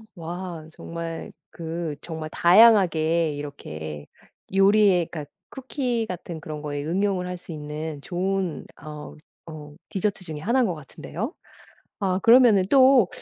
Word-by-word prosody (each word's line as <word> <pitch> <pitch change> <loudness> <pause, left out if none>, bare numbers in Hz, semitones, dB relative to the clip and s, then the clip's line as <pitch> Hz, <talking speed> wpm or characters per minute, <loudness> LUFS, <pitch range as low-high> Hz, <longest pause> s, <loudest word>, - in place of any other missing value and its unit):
와. 170 -1 -6
정말 165 0 -6 0.2
그 165 -2 -5
정말 160 -2 -6
다양하게 170 -5 +5
이렇게 80 - -7 0.5
요리의 195 -3 +4
그러니까 150 -3 -7 0.2
쿠키 255 -3 -2
같은 175 -3 -6
그런 155 -1 -6
거에 145 -1 -4
응용을 185 +2 0
할 180 0 -4
수 175 - -12
있는 150 0 -6
좋은 180 0 -2 0.2
어 150 0 -9 0.4
어 150 -1 -10 0.2
디저트 195 0 -2
중에 155 -3 -6
하나인 235 +6 +2
것 175 - -2
같은데요. 170 - -6 0.7
아 185 -2 +1
그러면 230 -5 +6
또 260 -6 +6
170 Hz, 260 characters per minute, -24 LUFS, 155-195 Hz, 0.7 s, 그러면